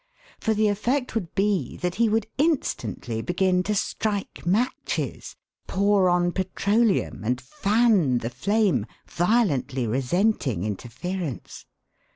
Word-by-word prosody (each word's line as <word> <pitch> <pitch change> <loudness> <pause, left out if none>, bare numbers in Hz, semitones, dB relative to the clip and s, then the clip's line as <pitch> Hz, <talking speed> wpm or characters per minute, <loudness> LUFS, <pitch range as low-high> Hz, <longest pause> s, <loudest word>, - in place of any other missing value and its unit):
For 220 - 0
the 215 0 +3
effect 240 +6 0
would 200 -7 -3
be 200 -1 0
that 180 -1 -2
he 230 - +4
would 220 0 +1
instantly 275 - -1
begin 180 +4 +1
to 210 +3 -1
strike 205 -2 -2
matches, 225 +8 -1 0.3
pour 200 -1 +3
on 175 0 +2
petroleum, 200 - 0
and 125 +3 0
fan 195 - +2
the 115 0 -3
flame, 190 - +1 0.2
violently 170 - +1
resenting 135 - 0
interference. 130 - -5
190 Hz, 115 wpm, -25 LUFS, 135-215 Hz, 0.3 s, he